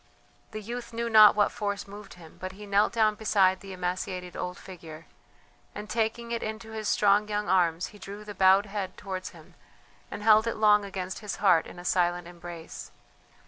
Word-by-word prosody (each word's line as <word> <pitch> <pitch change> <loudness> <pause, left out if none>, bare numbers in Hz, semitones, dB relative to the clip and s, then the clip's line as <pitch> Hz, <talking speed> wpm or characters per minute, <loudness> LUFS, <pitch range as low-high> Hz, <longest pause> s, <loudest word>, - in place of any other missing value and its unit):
The 215 -1 -7
youth 235 +2 -7
knew 235 0 -3
not 215 -2 +8
what 205 -1 +2
force 205 -2 -4
moved 205 -1 -11
him, 165 -3 -15
but 185 0 -5
he 210 +2 -11
knelt 200 +1 +2
down 220 -2 +2
beside 195 -3 +2
the 195 -1 -10
emaciated 180 0 -4
old 180 0 -5
figure 165 -3 -11 0.7
and, 210 0 -7
taking 230 +2 -2
it 235 - -2
into 220 +1 -6
his 220 -1 -5
strong 205 +1 +3
young 210 0 -2
arms, 175 -2 +1
he 205 - -14
drew 200 +2 -9
the 210 - -7
bowed 190 +1 +5
head 200 -2 -5
towards 190 -2 -5
him, 165 -3 -17 0.6
and 205 - -7
held 220 +1 +5
it 230 - -1
long 210 -1 +4
against 190 -2 -5
his 210 -2 -5
heart 180 -5 +3
in - - -12
a 175 - -10
silent 175 -1 +1
embrace. 175 -1 -9
200 Hz, 190 wpm, -27 LUFS, 180-215 Hz, 0.7 s, not